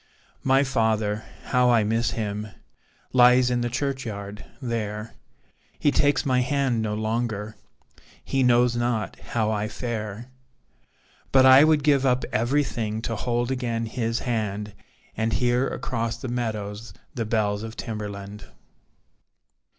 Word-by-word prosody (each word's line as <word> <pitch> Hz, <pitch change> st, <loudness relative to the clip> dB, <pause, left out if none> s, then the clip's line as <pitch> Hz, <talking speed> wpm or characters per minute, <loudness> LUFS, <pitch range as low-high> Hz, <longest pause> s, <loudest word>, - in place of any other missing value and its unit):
My 135 Hz, +1 st, +3 dB
father 110 Hz, -4 st, 0 dB, 0.2 s
how 125 Hz, -1 st, +2 dB
I 115 Hz, -3 st, +4 dB
miss 115 Hz, +3 st, +1 dB
him 105 Hz, -1 st, -3 dB, 0.7 s
Lies 125 Hz, 0 st, +6 dB
in 120 Hz, 0 st, +1 dB
the 120 Hz, -, -1 dB
churchyard 115 Hz, -6 st, -4 dB, 0.2 s
there, 115 Hz, -3 st, -4 dB, 0.6 s
He 145 Hz, -, +2 dB
takes 145 Hz, -1 st, +2 dB
my 130 Hz, -2 st, +2 dB
hand 135 Hz, -3 st, 0 dB
no 105 Hz, -1 st, -2 dB
longer 110 Hz, -1 st, -2 dB, 0.7 s
He 135 Hz, -, 0 dB
knows 120 Hz, -1 st, +4 dB
not 120 Hz, -3 st, -1 dB
how 110 Hz, -2 st, -1 dB
I 105 Hz, 0 st, -1 dB
fare. 110 Hz, +1 st, -5 dB, 1.0 s
But 130 Hz, -1 st, +6 dB
I 130 Hz, +2 st, +9 dB
would 155 Hz, -2 st, +3 dB
give 140 Hz, -2 st, +3 dB
up 130 Hz, -1 st, +2 dB
everything 115 Hz, -3 st, 0 dB
To 115 Hz, -, -2 dB
hold 120 Hz, +2 st, -1 dB
again 120 Hz, -3 st, -2 dB
his 115 Hz, 0 st, -2 dB
hand, 105 Hz, -3 st, -2 dB, 0.4 s
And 110 Hz, 0 st, -1 dB
hear 125 Hz, +5 st, +2 dB
across 115 Hz, -2 st, -3 dB
the 130 Hz, -, -6 dB
meadows 110 Hz, -2 st, -4 dB, 0.2 s
The 115 Hz, -, -3 dB
bells 105 Hz, -2 st, 0 dB
of 110 Hz, 0 st, -7 dB
Timberland. 105 Hz, -2 st, -6 dB
115 Hz, 130 wpm, -25 LUFS, 110-125 Hz, 1.0 s, I